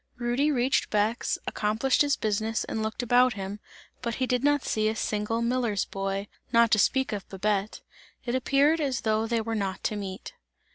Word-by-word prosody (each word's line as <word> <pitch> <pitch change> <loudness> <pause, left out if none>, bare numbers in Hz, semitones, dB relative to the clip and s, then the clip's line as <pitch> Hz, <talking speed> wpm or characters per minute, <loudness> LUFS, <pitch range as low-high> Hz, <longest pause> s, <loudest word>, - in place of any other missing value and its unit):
Rudy 245 +4 +1
reached 260 -2 +1
Bex, 215 +3 0
accomplished 220 +5 +1
his 285 -1 +3
business 220 +1 -1
and 220 - -3
looked 220 +3 -3
about 245 +1 +4
him, 195 +1 -6 0.4
but 235 -2 -2
he 260 - 0
did 250 0 0
not 290 -1 +3
see 215 0 +1
a 220 - -2
single 220 +1 -1
miller's 235 -4 0
boy, 195 +1 -3 0.2
not 230 -1 +4
to 215 - +4
speak 265 +5 +2
of 200 -2 -5
Babette. 200 +1 -1 0.4
It 240 - -2
appeared 280 +5 +3
as 270 -4 -1
though 220 0 +1
they 230 0 0
were 225 +1 -3
not 195 -3 -3
to 215 - -1
meet. 195 -2 -6
225 Hz, 185 wpm, -27 LUFS, 210-255 Hz, 0.4 s, about